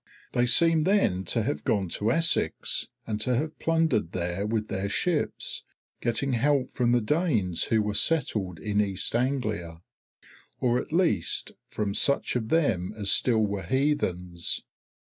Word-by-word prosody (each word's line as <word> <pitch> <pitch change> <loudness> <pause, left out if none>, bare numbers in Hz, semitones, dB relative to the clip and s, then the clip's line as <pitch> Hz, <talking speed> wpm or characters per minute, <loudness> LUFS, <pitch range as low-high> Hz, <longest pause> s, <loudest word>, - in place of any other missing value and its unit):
They 125 -1 +1
seem 165 +3 +4
then 185 - +2
to - - 0
have 75 - -2
gone 100 -3 0
to 105 +6 0
Essex 165 +4 +1 0.2
and 105 -1 -3
to 125 +2 +1
have 155 +5 -3
plundered 160 - +1
there 90 +3 -2
with 110 -1 -1
their 95 +1 -3
ships, 165 - -1 0.4
getting 125 +3 0
help 135 +2 +1
from 120 -1 +1
the 120 0 +3
Danes 110 - +1
who 110 -2 +2
were 105 0 -2
settled 105 - +1
in 105 +3 0
East 100 0 -2
Anglia, 110 -10 -2 0.8
or 125 0 +2
at - - -7
least 165 - +1 0.2
from 105 -2 -3
such 140 +5 +1
of 110 -3 -2
them 120 - +1
as 100 -2 +2
still 110 -4 +4
were 100 -1 -3
heathens. 90 - -1
110 Hz, 150 wpm, -27 LUFS, 100-140 Hz, 0.8 s, seem